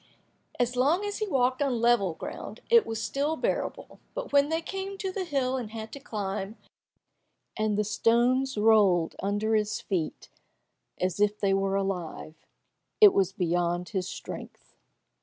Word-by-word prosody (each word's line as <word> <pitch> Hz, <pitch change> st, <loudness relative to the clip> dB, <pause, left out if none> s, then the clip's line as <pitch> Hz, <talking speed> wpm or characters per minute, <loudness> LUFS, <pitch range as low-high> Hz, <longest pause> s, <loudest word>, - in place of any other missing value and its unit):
As 245 Hz, 0 st, +1 dB
long 300 Hz, +11 st, +2 dB
as 410 Hz, 0 st, -3 dB
he 430 Hz, -, -1 dB
walked 260 Hz, -4 st, +1 dB
on 265 Hz, -4 st, +1 dB
level 225 Hz, -7 st, +3 dB
ground, -, -, -7 dB
it 465 Hz, -1 st, +6 dB
was 225 Hz, -1 st, -3 dB
still 280 Hz, +9 st, -1 dB
bearable, 485 Hz, +10 st, -3 dB, 0.2 s
but -, -, -5 dB
when 285 Hz, +1 st, +5 dB
they 325 Hz, 0 st, +1 dB
came 390 Hz, +3 st, -5 dB
to 380 Hz, 0 st, -3 dB
the 375 Hz, -1 st, -3 dB
hill 265 Hz, -5 st, 0 dB
and 240 Hz, -4 st, -5 dB
had 220 Hz, 0 st, -7 dB
to 280 Hz, -, -7 dB
climb, 205 Hz, -3 st, -4 dB, 1.0 s
and 215 Hz, -2 st, 0 dB
the 210 Hz, -, +2 dB
stones 240 Hz, +5 st, +2 dB
rolled 205 Hz, -6 st, +4 dB
down 195 Hz, -, -1 dB
under 215 Hz, +2 st, 0 dB
his 215 Hz, -1 st, +1 dB
feet 180 Hz, -6 st, -3 dB, 0.7 s
as 185 Hz, +1 st, -1 dB
if 210 Hz, 0 st, +2 dB
they 195 Hz, -1 st, +2 dB
were 195 Hz, 0 st, +1 dB
alive, 180 Hz, -5 st, -3 dB, 0.7 s
it 415 Hz, -3 st, +9 dB
was 190 Hz, -1 st, +2 dB
beyond 175 Hz, -1 st, -1 dB
his 190 Hz, -3 st, -2 dB
strength. -, -, -9 dB
220 Hz, 160 wpm, -28 LUFS, 195-275 Hz, 1.0 s, it